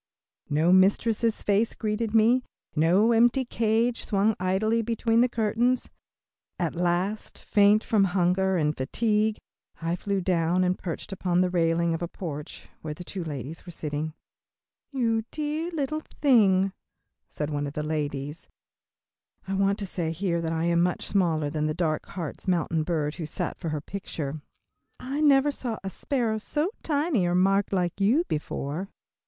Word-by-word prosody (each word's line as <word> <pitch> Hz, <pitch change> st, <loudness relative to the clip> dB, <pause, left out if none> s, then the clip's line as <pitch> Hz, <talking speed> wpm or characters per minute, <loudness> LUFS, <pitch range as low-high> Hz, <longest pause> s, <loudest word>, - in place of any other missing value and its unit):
No 160 Hz, +5 st, +3 dB
mistress' 215 Hz, +4 st, +3 dB
face 210 Hz, +3 st, +2 dB
greeted 215 Hz, 0 st, -2 dB
me, 230 Hz, +4 st, +5 dB, 0.3 s
no 180 Hz, +9 st, +4 dB
empty 240 Hz, +3 st, +4 dB
cage 230 Hz, +1 st, +1 dB
swung 210 Hz, +1 st, +2 dB
idly 205 Hz, +5 st, +1 dB
between 230 Hz, 0 st, +1 dB
the 250 Hz, -, +3 dB
curtains. 235 Hz, +3 st, 0 dB, 0.7 s
At 170 Hz, -3 st, -1 dB
length, 180 Hz, +4 st, -1 dB
faint 205 Hz, +1 st, +4 dB
from 210 Hz, -3 st, +3 dB
hunger 185 Hz, +1 st, +2 dB
and 150 Hz, -2 st, +1 dB
fatigue, 215 Hz, -, 0 dB, 0.4 s
I 165 Hz, +1 st, -1 dB
flew 200 Hz, +2 st, -2 dB
down 175 Hz, 0 st, +1 dB
and 180 Hz, 0 st, +2 dB
perched 180 Hz, +2 st, -6 dB
upon 180 Hz, -2 st, +1 dB
the 180 Hz, -1 st, +1 dB
railing 170 Hz, -1 st, +2 dB
of 165 Hz, -, -3 dB
a 175 Hz, -, -1 dB
porch 150 Hz, -5 st, -7 dB
where 155 Hz, -1 st, -5 dB
two 180 Hz, +2 st, -5 dB
ladies 150 Hz, 0 st, -6 dB
were 175 Hz, -, -9 dB
sitting. 155 Hz, 0 st, -4 dB, 0.8 s
"You 230 Hz, -5 st, +1 dB
dear 305 Hz, +2 st, -2 dB
little 310 Hz, -2 st, -2 dB, 0.2 s
thing," 195 Hz, -9 st, +4 dB, 0.6 s
said 150 Hz, 0 st, -4 dB
one 145 Hz, 0 st, -1 dB
of 140 Hz, -, -7 dB
the 150 Hz, -, -3 dB
ladies 145 Hz, -1 st, -3 dB, 1.0 s
I 195 Hz, -, -2 dB
want 195 Hz, +1 st, +2 dB
to 200 Hz, -, -4 dB
say 175 Hz, -3 st, -2 dB
here 170 Hz, 0 st, -1 dB
that 165 Hz, -1 st, -2 dB
I 165 Hz, 0 st, -1 dB
am 170 Hz, 0 st, +2 dB
much 180 Hz, 0 st, 0 dB
smaller 160 Hz, -7 st, +1 dB
than 155 Hz, 0 st, -1 dB
the 155 Hz, -, -2 dB
dark 155 Hz, -3 st, -1 dB
Hartz 170 Hz, 0 st, -6 dB
Mountain 165 Hz, -3 st, +1 dB
bird 155 Hz, -3 st, -1 dB
who 155 Hz, -, -3 dB
sat 180 Hz, +1 st, -3 dB
for 165 Hz, -, -3 dB
her 150 Hz, -1 st, -2 dB
picture 155 Hz, -5 st, -5 dB, 0.6 s
"I 270 Hz, +4 st, -3 dB
never 290 Hz, -1 st, +5 dB
saw 240 Hz, -5 st, -4 dB
a 195 Hz, -, -4 dB
sparrow 230 Hz, -4 st, -1 dB
so 300 Hz, -, -1 dB
tiny, 290 Hz, -, +1 dB
or 175 Hz, -, +1 dB
marked 195 Hz, +2 st, +3 dB
like 180 Hz, 0 st, -1 dB
you 240 Hz, +12 st, +4 dB
before." 155 Hz, +4 st, -3 dB
190 Hz, 160 wpm, -26 LUFS, 165-225 Hz, 1.0 s, me